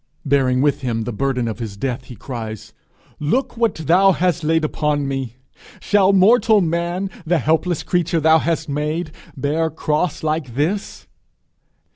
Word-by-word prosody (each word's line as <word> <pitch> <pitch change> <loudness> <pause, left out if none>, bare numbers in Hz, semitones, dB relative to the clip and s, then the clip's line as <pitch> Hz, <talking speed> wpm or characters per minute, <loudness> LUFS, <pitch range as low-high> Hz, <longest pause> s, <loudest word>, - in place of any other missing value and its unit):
Bearing 130 -2 +2
with 145 -2 +1
him 115 -3 -2
the 120 - -4
burden 125 0 -1
of 110 +1 -4
his 110 -4 -6
death, 125 +2 -3
he 125 - -10
cries, 110 -2 -7 0.5
'Look 245 - -1
what 230 -3 +1
thou 180 +5 +4
hast 175 -1 0
laid 160 0 +2
upon 150 -2 -1
me! 135 -4 -4 0.4
Shall 200 -2 +3
mortal 215 +3 +5
man, 170 +2 -1 0.2
the 175 +1 +1
helpless 160 +3 0
creature 175 -1 0
thou 160 +1 +5
hast 165 +1 -1
made, 150 +3 -2 0.3
bear 155 +4 0
cross 155 +1 -2
like 155 -6 -2
this?' 175 +9 -2
155 Hz, 150 wpm, -20 LUFS, 135-175 Hz, 0.5 s, mortal